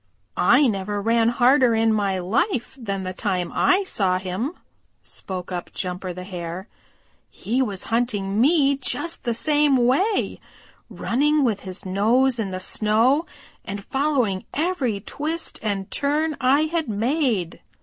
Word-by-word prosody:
"I 255 +10 +5
never 205 -3 -1
ran 230 +2 +2
harder 245 0 +4
in 225 0 +3
my 200 -3 0
life 240 - -1
than 195 -4 -3
the 185 0 -4
time 185 -2 -2
I 380 +2 +3
saw 190 - +1
him," 190 - -3 0.5
spoke 185 -1 -6
up 175 -1 -5
Jumper 180 0 -4
the 180 +1 -7
Hare. 180 +1 -6 0.6
"He 245 +5 -2
was 205 -7 -2
hunting 215 -4 0
me 280 -1 +4
just 330 +4 -4
the 235 -1 0
same 295 +1 +3
way, 280 - +1 0.5
running 295 +4 +1
with 220 -6 +1
his 190 -1 -7
nose 235 +7 +2
in 210 -3 -1
the 185 0 -4
snow 225 - +2 0.4
and 200 0 -6
following 265 -9 0
every 285 - -1
twist 320 - -4
and 200 -3 -3
turn 300 +2 0
I 265 +3 +4
had 315 -3 -1
made. 225 - -1
230 Hz, 140 wpm, -23 LUFS, 195-280 Hz, 0.6 s, I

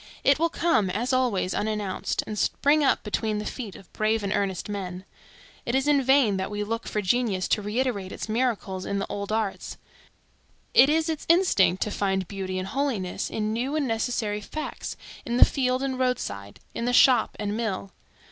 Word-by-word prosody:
It 275 +1 +4
will 335 +1 +2
come, 325 - +1
as 230 +8 -1
always, 235 -8 +1
unannounced, 210 -3 -2
and 215 - -5
spring 290 +7 +2
up 275 - +2
between 215 0 -1
the 210 - -4
feet 225 -7 -6
of 195 - -15
brave 215 0 +1
and 200 0 -1
earnest 190 -3 -1
men. 190 -3 -5 0.6
It 240 - -1
is 270 +2 +1
in 290 -2 +4
vain 265 -6 +4
that 190 0 -2
we 210 0 -3
look 230 +2 -4
for 210 - -2
genius 195 -2 +1
to 210 - +2
reiterate 210 -2 -2
its - - -6
miracles 215 -5 -1
in 200 - -2
the 195 - -1
old 200 0 -4
arts; 215 -3 -2 1.0
it 270 - +7
is 320 +1 +2
its 315 -2 -3
instinct 330 - +4
to 210 - -4
find 190 -3 -1
beauty 190 -2 -4
and 185 +1 -3
holiness 245 -10 -2
in 215 0 -2
new 255 +6 -2
and 300 -3 0
necessary 225 -2 -1
facts, 310 +8 -6 0.3
in 240 0 -2
the - - +9
field 255 -1 0
and 260 -1 -2
road 255 -1 +2
side, 100 0 -7
in 235 - -3
the 245 - 0
shop 255 0 +5
and 205 0 -2
mill. 200 -4 -3
215 Hz, 195 wpm, -26 LUFS, 195-255 Hz, 1.0 s, the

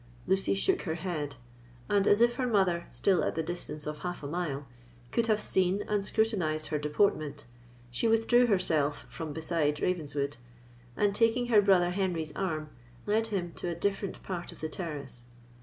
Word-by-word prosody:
Lucy 190 +1 +2
shook 370 - +1
her 160 - -2
head; 160 -5 -3 0.5
and, 200 -1 +2
as 205 +2 +5
if 240 0 +5
her 255 0 -1
mother, 190 -6 +2
still 175 +10 +2
at - - -1
the 160 - 0
distance 155 -3 -4
of 150 0 -4
half 175 -3 -5
a - - -3
mile, 150 -3 -3 0.5
could 230 -1 +1
have 215 -1 +3
seen 190 0 +1
and 210 -1 0
scrutinised 185 -9 0
her 150 - 0
deportment, 150 -2 0 0.5
she 125 - 0
withdrew 225 +2 +4
herself 155 -8 +1
from 160 -2 -5
beside 160 -1 0
Ravenswood, 145 -5 -1 0.6
and, 205 -1 +2
taking 230 +3 +2
her 215 -3 +6
brother 185 -3 +4
Henry's 175 -5 -1
arm, 155 -5 -2 0.3
led 220 +2 +1
him 180 -6 -3
to - - -4
a 170 - -2
different 200 +1 -2
part 180 -2 -5
of - - -14
the 155 - -3
terrace. 140 -8 -6
175 Hz, 175 wpm, -30 LUFS, 155-205 Hz, 0.6 s, her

